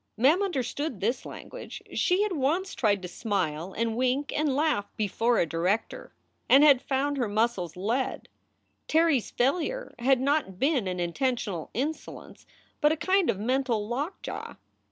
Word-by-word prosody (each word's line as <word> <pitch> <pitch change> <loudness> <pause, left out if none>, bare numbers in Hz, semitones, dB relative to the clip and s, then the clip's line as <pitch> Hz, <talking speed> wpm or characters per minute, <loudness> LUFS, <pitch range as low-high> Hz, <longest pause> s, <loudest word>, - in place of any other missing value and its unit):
Mem 285 - +4
understood 285 - -2
this 230 +7 -1
language. - - -9
She 385 +1 +2
had 420 - -1
once 335 +5 0
tried 205 -5 +1
to - - -4
smile 180 -4 -2
and 230 0 0
wink 255 +3 0
and 295 -3 +1
laugh 290 -9 +1
before 225 +3 +1
a - - +3
director, 175 +7 -2 0.4
and 275 +2 +7
had 280 -4 +6
found 280 +1 -1
her 245 -4 0
muscles 205 -5 -1
lead. 230 +8 -2 0.6
Terry 320 -2 +4
s 235 - -5
failure 355 - -1
had 260 +1 +3
not 270 -8 0
been 270 - +1
an 180 -1 -3
intentional 190 - -2
insolence, 290 +7 -5 0.3
but 295 - +5
a 320 - 0
kind 375 +1 +2
of - - +1
mental 235 -1 0
lockjaw. 280 - -4
255 Hz, 155 wpm, -27 LUFS, 210-300 Hz, 0.6 s, and